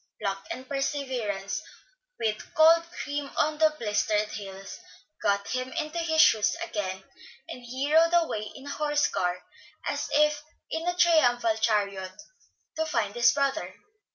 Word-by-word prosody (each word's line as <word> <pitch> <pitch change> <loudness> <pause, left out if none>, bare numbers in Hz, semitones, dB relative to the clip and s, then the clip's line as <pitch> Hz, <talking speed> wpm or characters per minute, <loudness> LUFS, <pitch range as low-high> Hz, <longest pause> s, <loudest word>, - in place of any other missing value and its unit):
Pluck 195 0 -3
and 260 0 -6
perseverance, 255 -8 -2 0.6
with 215 -1 -3
cold 330 +1 +6
cream 290 -4 -4
on 305 0 +1
the 310 -1 +4
blistered 210 -1 0
heels, 195 - -8 0.4
got 200 0 0
him 255 0 -3
into 315 +1 -3
his 320 -1 0
shoes 220 -4 +5
again, 205 - -4 0.4
and 250 - -8
he 260 +5 -3
rode 330 +1 +6
away 325 -12 0
in 270 - -11
a - - -7
horse 295 0 +1
car, 180 0 -2 0.4
as - - -2 0.6
in 325 +2 -3
a 355 - +1
triumphal 245 -10 +4
chariot, 200 -3 -1 0.6
to 320 - 0
find 215 -8 -1
his 235 0 +5
brother. 270 -10 -1
255 Hz, 140 wpm, -27 LUFS, 205-310 Hz, 0.6 s, cold